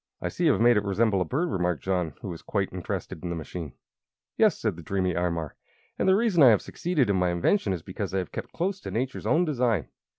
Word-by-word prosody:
"I - - -3
see 175 - -2
you 155 - +6
have 110 - -1
made 120 0 +6
it 105 - +1
resemble 100 0 +1
a - - +1
bird," 160 - -1
remarked 90 -3 -1
John, 90 -6 -1
who 100 - -4
was 85 -2 -7
quite 100 -3 -2
interested 90 -3 -5
in 90 - -3
the 85 - -2
machine. 80 -2 -6 0.6
"Yes," - - +4
said - - -1
the 85 - -9
dreamy 95 +2 -1
Imar, 85 -3 -1 0.5
"and - - +3
the 190 - +6
reason 205 -6 +2
I 130 - +9
have 105 -4 +4
succeeded 165 -8 0
in 100 -2 +2
my 90 -1 +2
invention 95 - +1
is 90 -4 -3
because - - -5
I 95 - -1
have 90 -4 -3
kept - - -6
close 190 +3 -2
to - - -7
Nature's 130 +4 -3
own 170 +3 +3
design. 120 - 0
100 Hz, 245 wpm, -27 LUFS, 90-135 Hz, 0.6 s, I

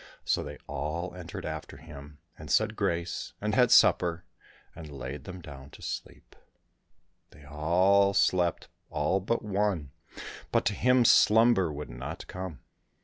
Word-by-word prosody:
So - - +1
they - - -8
all 85 +4 -4
entered 90 -2 -8
after 80 -1 -6
him, 75 0 -12 0.2
and 75 -1 -11
said 110 +8 +2
grace, 85 -4 -2
and 105 +1 -2
had 125 +1 +4
supper, 90 -7 +4 0.5
and 80 -2 -9
laid 70 +1 -7
them 90 -1 -8
down 70 -4 -11
to - - -14
sleep. - - -7 0.9
They 75 - -18
all 90 +6 +2
slept, 90 -3 +1 0.2
all 80 +5 0
but 110 +6 -2
one, 100 -8 -1 0.6
but - - +1
to 105 - +1
him 125 +3 +3
slumber 110 -6 +5
would 75 -3 -7
not - - -7
come. 90 -8 -7
85 Hz, 145 wpm, -28 LUFS, 75-100 Hz, 0.9 s, slumber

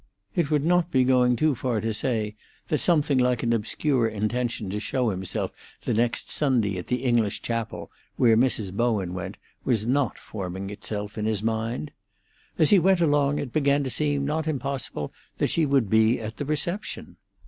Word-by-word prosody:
It 165 -5 +1
would 150 -1 +1
not 175 0 +3
be 130 -5 +3
going 125 -1 +4
too 155 +4 +2
far 125 -2 -1
to 110 +1 -1
say 110 -1 -1 0.3
that 150 - +1
something 150 -6 +3
like 125 -1 +2
an 115 -1 +2
obscure 120 +3 +1
intention 110 -1 -2
to 105 - -2
show 120 +2 0
himself 95 -1 -3 0.3
the - - -1
next 115 +2 +1
Sunday 115 -10 +1
at 90 - -8
the 125 +1 -1
English 120 -5 +1
chapel, 115 -1 -3 0.2
where 115 -2 +5
Mrs. 110 -5 +1
Bowen 105 -5 0
went, 90 - -5 0.3
was 110 -4 +1
not 130 +1 +1
forming 95 -1 -6
itself 105 +1 -5
in 105 - -1
his 110 -2 -1
mind. 110 -6 -2 0.7
As 155 - +4
he 200 - +7
went 190 +1 +3
along 145 -3 +2
it 125 - -4
began 140 -1 +2
to 130 - -2
seem 145 -1 0
not 155 +2 -1
impossible 135 - -3 0.2
that - - +1
she 160 -3 +2
would 135 -5 +2
be 110 +3 +3
at 110 0 -6
the 145 - -3
reception. 155 +7 -3
120 Hz, 180 wpm, -25 LUFS, 110-145 Hz, 0.7 s, he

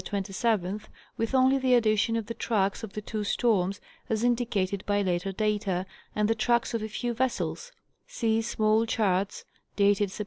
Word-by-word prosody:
27th), 200 0 -1 0.3
with 230 +3 -1
only 260 +1 +4
the 260 -1 +4
addition 220 -1 +2
of 225 -2 -1
the 230 - -5
tracks 205 -3 0
of 215 - -7
the 210 - -5
two 215 0 -3
storms 200 -3 +1 0.3
(as 220 0 0
indicated 225 -6 +1
_ - - -16
by 205 0 +2
later 180 +1 -1
data) 205 -3 -1 0.3
and 210 0 +2
the 225 - +3
tracks 235 +2 +1
of 230 - -1
a 215 - -3
few 240 +2 -2
vessels 260 - -2 0.4
(see 225 - 0
small 220 0 +1
charts 200 -4 0 0.3
dated 205 0 +3
Sept. 190 - -10
215 Hz, 175 wpm, -28 LUFS, 200-230 Hz, 0.4 s, only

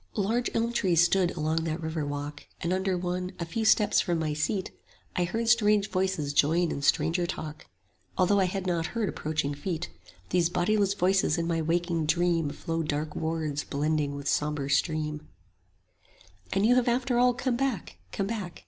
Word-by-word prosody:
Large 225 +4 0
elm 230 +1 +1
trees 175 -7 +3
stood 185 -1 +2
along 160 +1 0
that 160 +1 -2
river 160 -1 -3
walk; 145 0 -5
And 170 +2 0
under 190 0 0
one, 180 +1 -3
a 170 - -2
few 220 +7 -3
steps 215 -1 +4
from 175 -3 0
my 155 -2 -1
seat, 185 +6 -1 0.4
I 180 - +1
heard 225 +6 -2
strange 210 -3 +3
voices 185 -7 -1
join 165 +4 +3
in 140 - -3
stranger 170 +4 +2
talk, 155 -3 -6 0.5
Although 200 +2 +3
I 190 - +4
had 190 +1 -3
not 170 -3 0
heard 220 -3 +1
approaching 150 -2 -2
feet: 155 - -4
10 90 - -21 0.2
These 175 -1 +3
bodiless 195 +3 +1
voices 190 -3 +2
in 170 - -1
my 165 -1 0
waking 165 0 0
dream 170 -2 +2
Flowed 165 +2 -3
dark 150 +1 -2
words 160 -2 -2
blending 150 0 -1
with 140 0 -6
sombre 150 -2 0
stream: 150 +1 0 1.2
And 195 +2 +2
you 245 +2 +5
have 250 - +2
after 245 0 +1
all 250 0 +4
come 250 0 -1
back; 255 - -2
come 195 - -2
back. 200 -5 -5
175 Hz, 180 wpm, -28 LUFS, 155-195 Hz, 1.2 s, you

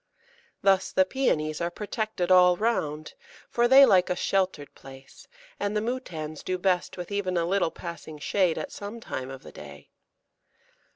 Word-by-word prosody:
Thus 195 -1 +3
the 190 - +3
Pæonies 155 - -1
are 170 - 0
protected 210 -1 -3
all 180 -1 +6
round, 155 -9 -2 0.4
for 240 0 +3
they 270 +2 +9
like 185 -7 +4
a 180 - 0
sheltered 185 -6 -1
place, 135 0 -14 0.3
and 205 +1 -1
the - - +2
Moutans 175 - -5
do 185 - -2
best 180 -1 0
with 180 +2 -7
even 190 -3 -1
a 170 - +1
little 190 -1 +1
passing 165 -2 -8
shade 170 +3 +1
at - - -5
some 205 +3 -7
time 130 - -6
of 135 +1 -9
the - - -11
day. - - -12
185 Hz, 165 wpm, -26 LUFS, 160-205 Hz, 0.4 s, they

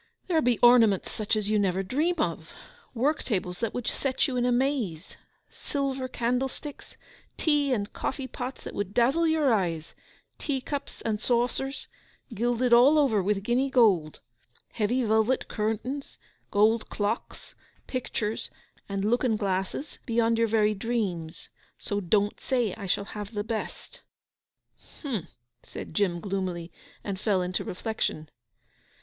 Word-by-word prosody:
'There 330 -4 +2
be 245 -4 +2
ornaments 230 -5 +6
such 215 +1 -1
as 210 -2 -1
you 215 0 +2
never 190 -1 +1
dream 300 - +1
of; 305 - -2 0.5
work 290 +6 +1
tables 180 -5 -2
that 230 -2 -1
would 245 - -4
set 270 +2 0
you 265 - -3
in 245 0 +2
amaze; 245 - 0 0.3
silver 270 -2 -3
candlesticks, 255 +4 -3 0.4
tea 295 -3 +2
and 205 -5 -1
coffee 270 0 -3
pots 255 0 -6
that - - -7
would 205 0 -3
dazzle 270 +8 +4
your 310 -5 +3
eyes; 165 -6 -1 0.5
tea 280 -3 -1
cups, 280 +2 -5
and 215 -2 -1
saucers, 250 +3 0 0.5
gilded 240 +2 +1
all 260 +6 +7
over 255 -9 +4
with 195 +1 0
guinea 250 +5 +1
gold; 200 - +3 0.5
heavy 240 +3 +1
velvet 220 +3 +2
curtains, 225 +6 -3 0.3
gold 215 +2 +3
clocks, 210 +2 -3 0.3
pictures, 225 -4 -3 0.4
and 195 0 -1
looking 235 0 +2
glasses 195 +8 -2
beyond 230 -1 +2
your 230 0 +2
very 215 -1 +3
dreams. 195 -7 -3 0.3
So 205 - -2
don't 205 +3 +1
say 245 -7 0
I 200 -3 -7
shall 200 +2 0
have 210 +1 -7
the 205 - -1
best.' 225 0 -5 1.0
'H'm!' 235 - -3 0.3
said - - -9
Jim 175 -1 +1
gloomily; 185 -3 -3 0.3
and 195 -2 -4
fell 195 -3 +1
into 180 0 -2
reflection. 180 -6 -3
225 Hz, 140 wpm, -27 LUFS, 200-255 Hz, 1.0 s, all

